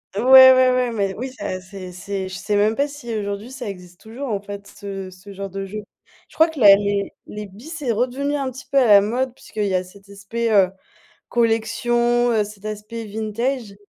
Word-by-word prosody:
Ouais, 210 Hz, -, -1 dB
ouais, 260 Hz, 0 st, +10 dB, 0.2 s
ouais 250 Hz, -1 st, +1 dB
mais 200 Hz, -3 st, -1 dB
oui 255 Hz, +5 st, -6 dB
ça 185 Hz, -7 st, -5 dB
c'est 185 Hz, -1 st, -10 dB
c'est 190 Hz, +1 st, -5 dB
je -, -, -9 dB
sais 210 Hz, -1 st, -1 dB
même 210 Hz, +2 st, +2 dB
pas 280 Hz, +1 st, +1 dB
si 275 Hz, -5 st, -8 dB
aujourd'hui 205 Hz, +3 st, -4 dB
ça 255 Hz, -6 st, -6 dB
existe 180 Hz, -2 st, -11 dB
toujours 240 Hz, +4 st, -7 dB
en 200 Hz, -2 st, -2 dB
fait 200 Hz, 0 st, -8 dB
ce 195 Hz, -2 st, -8 dB
ce 185 Hz, +2 st, -13 dB
genre 195 Hz, -1 st, -6 dB
de 195 Hz, 0 st, -5 dB
jeu. 210 Hz, +2 st, -7 dB, 0.5 s
Je -, -, -20 dB
crois 320 Hz, +1 st, +4 dB
que 315 Hz, -4 st, -8 dB
la 200 Hz, -3 st, +9 dB
les 200 Hz, -1 st, -1 dB
les 210 Hz, 0 st, -7 dB
billes 205 Hz, +9 st, -14 dB
c'est 300 Hz, -7 st, -3 dB
redevenu 260 Hz, +5 st, -1 dB
un 275 Hz, -2 st, -2 dB
petit 260 Hz, +1 st, -10 dB
peu 275 Hz, -, +4 dB
à 250 Hz, -, +4 dB
la 200 Hz, -1 st, +8 dB
mode 250 Hz, +4 st, -2 dB
puisqu'il 210 Hz, -2 st, -4 dB
y 190 Hz, -, 0 dB
a 185 Hz, -, +1 dB
cet 200 Hz, +2 st, -17 dB
aspect, 220 Hz, +4 st, -3 dB
heu, 190 Hz, -3 st, +4 dB, 0.6 s
collection, 240 Hz, +1 st, +1 dB
heu, 215 Hz, -2 st, +2 dB
cet 210 Hz, -1 st, -13 dB
aspect 215 Hz, +2 st, -6 dB
vintage 220 Hz, +1 st, -3 dB
215 Hz, 215 wpm, -21 LUFS, 200-245 Hz, 0.6 s, ouais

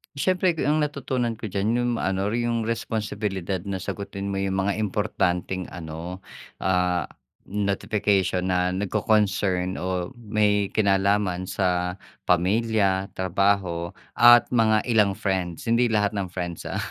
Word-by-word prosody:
Siyempre, 180 Hz, +4 st, +2 dB
ang 150 Hz, +2 st, +2 dB
yung -, -, +1 dB
natutunan 130 Hz, -4 st, -2 dB
ko 110 Hz, -1 st, -7 dB
diyan 100 Hz, +2 st, -1 dB
yung 120 Hz, 0 st, +1 dB
ano, 95 Hz, +1 st, 0 dB
yung 115 Hz, 0 st, -1 dB
responsibilidad 105 Hz, -4 st, -2 dB
na 95 Hz, -2 st, -3 dB
sagutin 100 Hz, +1 st, -5 dB
mo 100 Hz, -, -2 dB
yung 95 Hz, 0 st, -1 dB
mga 100 Hz, +1 st, 0 dB
importanteng 95 Hz, -3 st, -1 dB
ano, 85 Hz, +2 st, -7 dB, 0.4 s
ah, 90 Hz, -3 st, +1 dB, 0.4 s
notification 100 Hz, -2 st, 0 dB
na 90 Hz, -1 st, +1 dB
nagko-concern 100 Hz, -1 st, +1 dB
o 90 Hz, +2 st, -2 dB
may 105 Hz, -4 st, +1 dB
kinalaman 100 Hz, -2 st, +1 dB
sa 90 Hz, -1 st, 0 dB, 0.3 s
pamilya, 100 Hz, +1 st, +2 dB
trabaho 95 Hz, -2 st, +1 dB, 0.2 s
at 120 Hz, 0 st, +7 dB
mga 110 Hz, -2 st, +3 dB
ilang 105 Hz, -5 st, +2 dB
friends, 95 Hz, -4 st, -2 dB
hindi 115 Hz, +1 st, +3 dB
lahat 105 Hz, -1 st, +1 dB
ng 100 Hz, -3 st, -3 dB
friends, 85 Hz, -2 st, -5 dB
ah. -, -, -3 dB
100 Hz, 130 wpm, -25 LUFS, 90-110 Hz, 0.4 s, at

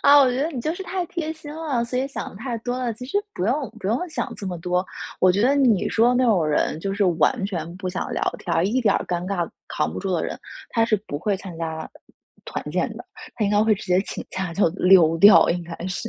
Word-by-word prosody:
啊， 285 Hz, +1 st, +7 dB
我 260 Hz, -, +4 dB
觉 250 Hz, -, -2 dB
得 300 Hz, -, +1 dB
你 260 Hz, -6 st, -4 dB
就 310 Hz, -, -1 dB
是 385 Hz, -, -6 dB
太 370 Hz, -1 st, -3 dB
贴 325 Hz, -2 st, -4 dB
心 310 Hz, -2 st, -10 dB
了， 300 Hz, -7 st, -1 dB
所 250 Hz, +1 st, -3 dB
以 270 Hz, -, -1 dB
想 275 Hz, -, -6 dB
得 -, -, -13 dB
太 240 Hz, +2 st, -4 dB
多 245 Hz, +2 st, -3 dB
了。 245 Hz, -2 st, -1 dB
其 250 Hz, -, -9 dB
实 280 Hz, +11 st, 0 dB, 0.2 s
不 -, -, -2 dB
用 260 Hz, +3 st, 0 dB
不 195 Hz, -, -6 dB
用 250 Hz, -, 0 dB
想 295 Hz, -5 st, -3 dB
这 200 Hz, -, -7 dB
么 180 Hz, -2 st, -3 dB
多， 180 Hz, +2 st, 0 dB, 0.4 s
我 185 Hz, -, +6 dB
觉 195 Hz, +3 st, +1 dB
得 265 Hz, +4 st, +4 dB
你 250 Hz, -9 st, +3 dB
说 235 Hz, +2 st, +4 dB
那 255 Hz, +1 st, +3 dB
种 195 Hz, -9 st, +3 dB
人 155 Hz, +1 st, 0 dB
就 195 Hz, +2 st, -2 dB
是 200 Hz, 0 st, +1 dB
完 185 Hz, -, +2 dB
全 175 Hz, -3 st, -4 dB
不 185 Hz, 0 st, -6 dB
想 180 Hz, -, -4 dB
聊 -, -, -2 dB, 0.2 s
天， 170 Hz, -1 st, 0 dB
一 240 Hz, +6 st, +1 dB
点 210 Hz, -5 st, +3 dB
尴 175 Hz, 0 st, -2 dB
尬 180 Hz, -3 st, -1 dB, 0.2 s
扛 150 Hz, -, -1 dB
不 -, -, -5 dB
住 195 Hz, -, -3 dB
的 170 Hz, -, 0 dB
人， -, -, -5 dB, 0.3 s
他 225 Hz, -2 st, +2 dB
是 215 Hz, -, +3 dB
不 145 Hz, -, -4 dB
会 200 Hz, +4 st, 0 dB
参 185 Hz, -3 st, -9 dB
加 160 Hz, -1 st, -4 dB, 0.6 s
团 -, -, -5 dB
建 -, -, 0 dB
的， -, -, -9 dB, 0.3 s
他 215 Hz, -, -1 dB
应 200 Hz, -, +1 dB
该 210 Hz, 0 st, +4 dB
会 220 Hz, -1 st, +4 dB
直 -, -, -9 dB
接 180 Hz, +1 st, +3 dB
请 -, -, -5 dB
假 190 Hz, -2 st, -3 dB
就 195 Hz, -1 st, +3 dB
溜 175 Hz, -3 st, +5 dB
掉 205 Hz, +5 st, +8 dB
应 175 Hz, 0 st, -1 dB
该 170 Hz, 0 st, -8 dB
是。 190 Hz, +5 st, -3 dB
205 Hz, 285 characters per minute, -23 LUFS, 180-250 Hz, 0.6 s, 掉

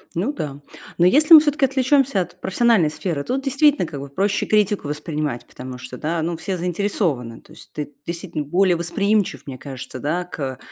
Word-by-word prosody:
Ну 205 Hz, -, -1 dB
да. 145 Hz, -, -5 dB, 0.4 s
Но 175 Hz, -, +4 dB
если 305 Hz, -, +7 dB
мы -, -, +12 dB
всё-таки 295 Hz, -1 st, +2 dB
отвлечёмся 265 Hz, -4 st, +2 dB
от -, -, -8 dB
профессиональной 190 Hz, -4 st, +3 dB
сферы, 155 Hz, -2 st, -3 dB
тут 265 Hz, -, -2 dB
действительно 280 Hz, -, +3 dB
как 145 Hz, -3 st, -7 dB
бы 140 Hz, -, -7 dB
проще 195 Hz, +8 st, 0 dB
критику 210 Hz, -5 st, +2 dB
воспринимать, 150 Hz, -3 st, -3 dB
потому 125 Hz, 0 st, -9 dB
что, 125 Hz, 0 st, -9 dB
да, 165 Hz, +3 st, -2 dB
ну, 170 Hz, +1 st, -2 dB
все 190 Hz, +3 st, -4 dB
заинтересованы, 170 Hz, -, -2 dB
то -, -, -21 dB
есть -, -, -15 dB
ты 150 Hz, -1 st, -5 dB
действительно 170 Hz, -2 st, -4 dB
более 180 Hz, +5 st, +2 dB
восприимчив, 200 Hz, +4 st, 0 dB
мне 135 Hz, -2 st, -7 dB
кажется, 130 Hz, -2 st, -8 dB
да, 165 Hz, +6 st, -1 dB
к 135 Hz, -7 st, -5 dB
175 Hz, 185 wpm, -21 LUFS, 145-215 Hz, 0.4 s, мы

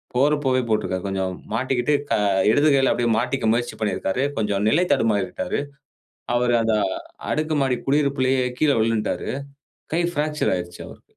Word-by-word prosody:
போறப்போவே 135 Hz, -1 st, +2 dB
போட்டிருக்கிறாரு. 95 Hz, -3 st, -1 dB
கொஞ்சம் 95 Hz, -1 st, -2 dB, 0.2 s
மாட்டிக்கிட்டு 130 Hz, +3 st, 0 dB, 0.2 s
க -, -, +4 dB, 0.4 s
இடது 145 Hz, +6 st, +3 dB
கையில 135 Hz, -1 st, +3 dB
அப்படியே 120 Hz, -1 st, 0 dB
மாட்டிக்க 125 Hz, 0 st, -1 dB
முயற்சி 120 Hz, +1 st, -2 dB
பண்ணியிருக்காரு. 110 Hz, +3 st, -1 dB
கொஞ்சம் 105 Hz, -1 st, 0 dB
நிலை 170 Hz, +9 st, +3 dB
தடுமாறிவிட்டாரு. 105 Hz, -2 st, 0 dB, 0.8 s
அவரு 120 Hz, 0 st, +2 dB
அந்த 110 Hz, -1 st, +1 dB, 0.6 s
அடுக்கு 155 Hz, 0 st, 0 dB
மாடி 125 Hz, -2 st, +1 dB
குடியிருப்புலயே 135 Hz, -2 st, +2 dB, 0.2 s
கீழே 145 Hz, -5 st, +3 dB
விலுன்ட்டாரு. 110 Hz, -1 st, -1 dB, 0.7 s
கை 175 Hz, -, +1 dB
பிராக்சர் 150 Hz, 0 st, 0 dB
ஆயிடுச்சு 90 Hz, 0 st, -6 dB
அவருக்கு. -, -, -13 dB
125 Hz, 135 wpm, -23 LUFS, 110-140 Hz, 0.8 s, க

